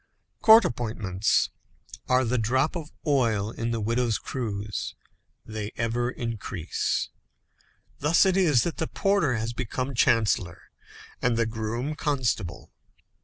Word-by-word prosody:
Court 220 -1 +8
appointments 110 - 0 0.6
are 130 0 +4
the 125 +1 +1
drop 130 +9 +1
of 160 -3 -6
oil 115 -8 +1
in 115 0 -3
the 115 -1 -1
widow's 115 +1 +1
cruse, 105 -5 -4 0.5
they 110 -1 -5
ever 115 +1 0
increase. 115 -8 -3 0.9
Thus 150 +7 +4
it 190 -1 +3
is 155 -11 +4
that 170 - -3
the 160 - -1
porter 195 -10 +1
has 115 +2 -2
become 125 +2 -3
chancellor, 115 -7 +1 0.5
and 125 -2 +2
the 115 - +2
groom, 115 +5 -3
constable. 130 - -2
120 Hz, 120 wpm, -26 LUFS, 110-135 Hz, 0.9 s, Court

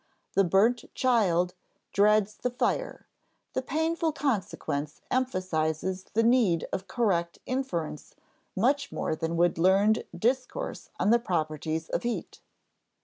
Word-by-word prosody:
The 195 - +4
burnt 210 +7 +3
child 185 -9 +2 0.4
dreads 210 0 +4
the 250 - -2
fire; 250 - -2 0.5
the 260 - 0
painful 320 +3 0
consequence 190 - -2
emphasizes 185 -6 -1
the 225 - +4
need 225 -8 +3
of 190 - -3
correct 180 -8 0
inference 180 - -3 0.4
much 270 +8 +1
more - - -2
than 165 +1 -2
would 175 0 +2
learned 195 +5 +4
discourse 255 - -1
on 210 - +3
the 235 - +5
properties 160 -5 -2
of - - -1
heat. 240 0 -4
200 Hz, 120 wpm, -28 LUFS, 170-250 Hz, 0.5 s, the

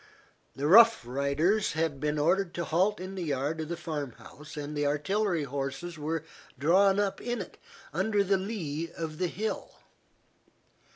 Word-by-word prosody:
The 140 - -3
Rough 225 - +7
Riders 140 - +1
had 160 -3 -1
been 150 +1 -1
ordered 175 +4 +1
to 170 - -2
halt 190 +7 +1
in 185 +1 -6
the 190 - -5
yard 150 0 -1
of 155 - -5
the 170 - -3
farm 150 -6 -4
house 150 +5 -13
and 150 +1 -5
the 145 0 +1
artillery 175 +4 0
horses 140 +4 -4
were 160 +1 -2 0.3
drawn 190 +6 +4
up 200 -1 -1
in 240 0 -2
it, - - -8 0.3
under 210 -2 +2
the 195 0 +2
lee 170 -6 -4
of 160 -2 -5
the 180 - +1
hill. 215 +6 -4
165 Hz, 165 wpm, -29 LUFS, 145-195 Hz, 0.3 s, Rough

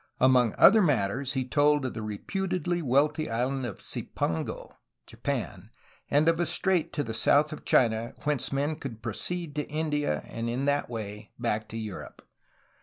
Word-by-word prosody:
Among 125 -3 +4
other 220 +2 +8
matters 130 - +1
he 130 -2 -1
told 145 0 +3
of 130 - -3
the 115 - -5
re 105 -1 -4
putedly 180 - -2
wealthy 150 +3 +2
island 125 +3 -1
of 100 - -8
"Cipango'^ 80 -1 -3 0.3
(Japan) - - -4 0.4
and 150 +3 +3
of 165 0 +3
a 175 - +1
strait 180 0 +1
to 145 - -1
the 115 - -5
south 150 +6 +3
of 155 - -10
China 115 0 +2
whence 150 -4 -1
men 145 +3 -1
could 120 -8 -8
proceed 160 +8 -3
to 150 - -2
India 150 - -1
and 115 0 -4
in 125 +4 -1
that 145 -2 +1
way 105 -2 -6
back 110 -2 -1
to 115 - -6
Europe. 110 -3 -8
135 Hz, 170 wpm, -28 LUFS, 115-150 Hz, 0.4 s, other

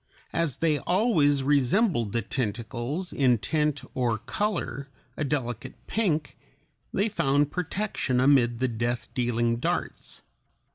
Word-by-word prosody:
As 165 -5 0
they 155 -3 +2
always 165 - +2
resembled 140 - +2
the 115 +1 -1
tentacles 120 - -3
in 125 -4 +3
tint 150 +4 0
or 120 -3 0
color, 140 - -3 0.3
a - - -2
delicate 125 -6 -3
pink, 160 -10 -1 0.6
they 200 +3 +1
found 145 -6 +1
protection 180 -7 -1
amid 125 -3 +4
the 130 +2 +1
death 120 +1 -3
dealing 120 -1 +1
darts. - - -3
135 Hz, 115 wpm, -27 LUFS, 120-160 Hz, 0.6 s, amid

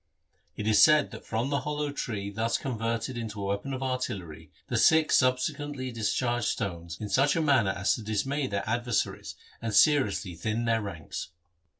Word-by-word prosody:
It 105 - -4
is 110 -2 +5
said 155 -1 +6
that - - -10
from 115 +5 -1
the 140 - +1
hollow 150 +2 -2
tree 105 -7 -4
thus 115 +2 0
converted 115 -1 -3
into 110 -2 -5
a 100 - -3
weapon 100 +7 -2
of 135 0 -3
artillery 105 -11 -4 0.2
the - - -3
Sikhs 160 -1 +5
subsequently 130 +1 -1
discharged 120 +1 0
stones 85 -4 -3
in 105 - -4
such 135 +6 +3
a - - +1
manner 135 -9 +3
as 95 +1 +1
to - - -4
dismay 130 +7 -1
their 100 -2 -3
adversaries 120 -1 -1 0.3
and 115 -3 -2
seriously 130 - +3
thin 110 +8 -2
their 115 -1 +2
ranks. 85 -8 -6
115 Hz, 175 wpm, -28 LUFS, 100-135 Hz, 0.3 s, said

